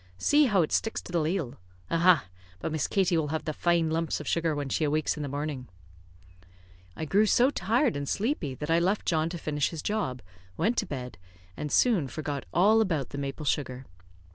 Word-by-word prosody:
See 295 Hz, -, +4 dB
how 200 Hz, -8 st, +3 dB
it 155 Hz, -, -4 dB
sticks 225 Hz, -, 0 dB
to -, -, -10 dB
the 175 Hz, -, +1 dB
ladle. 160 Hz, -5 st, -2 dB, 0.3 s
Aha! 170 Hz, -, +4 dB, 0.3 s
But 160 Hz, -, -3 dB
Miss 155 Hz, -2 st, -1 dB
Katie 185 Hz, -3 st, +2 dB
will 155 Hz, -2 st, 0 dB
have 160 Hz, +1 st, -3 dB
the 155 Hz, -, -2 dB
fine 170 Hz, 0 st, +1 dB
lumps 165 Hz, 0 st, -1 dB
of 150 Hz, -, -8 dB
sugar 165 Hz, -2 st, +1 dB
when 145 Hz, -1 st, -3 dB
she 145 Hz, -, -1 dB
awakes 155 Hz, 0 st, +1 dB
in 150 Hz, -, -6 dB
the 145 Hz, -, -3 dB
morning." 145 Hz, -2 st, -4 dB, 1.3 s
I 160 Hz, -, -4 dB
grew 205 Hz, +7 st, +3 dB
so 250 Hz, +6 st, +4 dB
tired 235 Hz, +5 st, +1 dB
and 140 Hz, -1 st, -3 dB
sleepy 200 Hz, -, -1 dB
that 150 Hz, +4 st, -4 dB
I 165 Hz, -, +4 dB
left 190 Hz, +4 st, 0 dB
John 160 Hz, -1 st, +1 dB
to 175 Hz, -, -5 dB
finish 150 Hz, -3 st, -1 dB
his 165 Hz, -3 st, -7 dB
job, 200 Hz, -, -2 dB, 0.3 s
went 225 Hz, +8 st, +1 dB
to -, -, 0 dB
bed, 125 Hz, -, -6 dB, 0.4 s
and 150 Hz, -, -5 dB
soon 210 Hz, -, +3 dB
forgot 145 Hz, 0 st, -4 dB
all 210 Hz, +6 st, +4 dB
about 160 Hz, -, -1 dB
the 140 Hz, -, -6 dB
maple 140 Hz, +2 st, -4 dB
sugar. 130 Hz, -2 st, -2 dB
160 Hz, 205 wpm, -28 LUFS, 145-190 Hz, 1.3 s, See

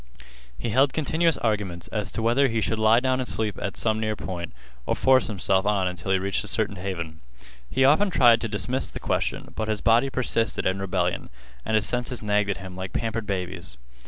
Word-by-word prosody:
He 120 Hz, -, -3 dB
held 135 Hz, +5 st, +3 dB
continuous 160 Hz, +2 st, +1 dB
arguments 105 Hz, -6 st, -2 dB
as 105 Hz, -3 st, -2 dB
to 110 Hz, -, -2 dB
whether 120 Hz, +5 st, +4 dB
he 115 Hz, -3 st, -1 dB
should 110 Hz, 0 st, -1 dB
lie 110 Hz, +2 st, +5 dB
down 130 Hz, 0 st, 0 dB
and 130 Hz, -, -3 dB
sleep 105 Hz, -3 st, -2 dB
at 100 Hz, -, -3 dB
some 110 Hz, -1 st, +1 dB
near 110 Hz, -1 st, -1 dB
spot, 85 Hz, -2 st, -4 dB, 0.4 s
or -, -, +1 dB
force 130 Hz, -1 st, +4 dB
himself 95 Hz, -2 st, +1 dB
on 100 Hz, -3 st, +2 dB
until 90 Hz, +1 st, -4 dB
he 95 Hz, -, +4 dB
reached 95 Hz, +1 st, -1 dB
a -, -, -6 dB
certain -, -, -1 dB
haven. 85 Hz, -4 st, -5 dB, 0.5 s
He 130 Hz, 0 st, +3 dB
often 155 Hz, +9 st, +5 dB
tried 120 Hz, -9 st, +5 dB
to 115 Hz, -, -1 dB
dismiss 115 Hz, +5 st, -2 dB
the -, -, -7 dB
question, -, -, -2 dB
but 110 Hz, -, -2 dB
his 110 Hz, -1 st, -1 dB
body 115 Hz, +4 st, +4 dB
persisted 115 Hz, -3 st, -1 dB
in 95 Hz, +1 st, +1 dB
rebellion 90 Hz, -2 st, -1 dB, 0.3 s
and 110 Hz, -, -1 dB
his 105 Hz, -2 st, +3 dB
senses 125 Hz, -1 st, -2 dB
nagged 105 Hz, -1 st, +1 dB
at 100 Hz, -, -1 dB
him 95 Hz, -1 st, -9 dB
like 95 Hz, 0 st, -6 dB
pampered 115 Hz, -2 st, -2 dB
babies. 90 Hz, -4 st, -4 dB
110 Hz, 210 wpm, -25 LUFS, 95-120 Hz, 0.5 s, lie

